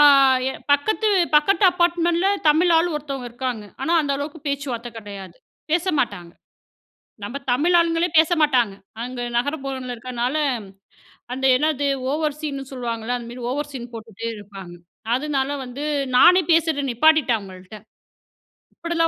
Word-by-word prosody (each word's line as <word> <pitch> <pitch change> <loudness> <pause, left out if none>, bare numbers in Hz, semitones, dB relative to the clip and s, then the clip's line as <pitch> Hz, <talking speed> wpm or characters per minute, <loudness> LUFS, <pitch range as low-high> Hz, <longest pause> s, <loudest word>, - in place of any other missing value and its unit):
ஆ 295 - +8 0.5
எ - - -5 0.2
பக்கத்து 435 +10 +1 0.3
பக்கத்து 390 +7 +4
அபார்ட்மெண்ட்ல 345 +1 +1 0.2
தமிழ் 335 +4 +4
ஆளு 335 +2 +3
ஒருத்தொங்க 275 -4 -5
இருக்காங்க. 245 -3 -4 0.2
ஆனா 330 - 0
அந்த 285 -2 -1
அளவுக்கு 290 +3 -6
பேச்சுவார்த்த 275 -4 -3
கடையாது. 200 -5 -9 0.4
பேசமாட்டாங்க. 280 - -1 0.9
நம்ம 240 +7 -6 0.2
தமிழ் 315 +8 +2
ஆளுங்களே 335 0 +2
பேசமாட்டாங்க. 300 - +3 0.3
அங்க 250 0 -6 0.2
நகரப்புரோல 270 -1 -3
இருக்கனால, 250 +3 -3 1.0
அந்த 265 +1 -3
என்னது 290 +1 0 0.2
ஓவர் 300 -1 -1
ஸீன்னு 285 -3 -4
சொல்லுவாங்கல. 240 -1 -3
அந்த 235 -1 -9
மாரி 245 +1 -9
ஓவர் 295 +2 -3
ஸீன்னு 245 -3 -8
போட்டுட்டு 225 0 -8
இருப்பாங்க. 195 -4 -11 0.4
அதனால 275 0 -1 0.2
வந்து 255 +3 -7 0.3
நானே 360 +7 +7
பேசுறது 320 -3 +2
நிப்பாட்டிட்டே 305 0 +4
அவங்கள்ட்ட. 190 -1 -11 1.0
இப்டிலா 335 -1 0
275 Hz, 125 wpm, -22 LUFS, 240-315 Hz, 1.0 s, ஆ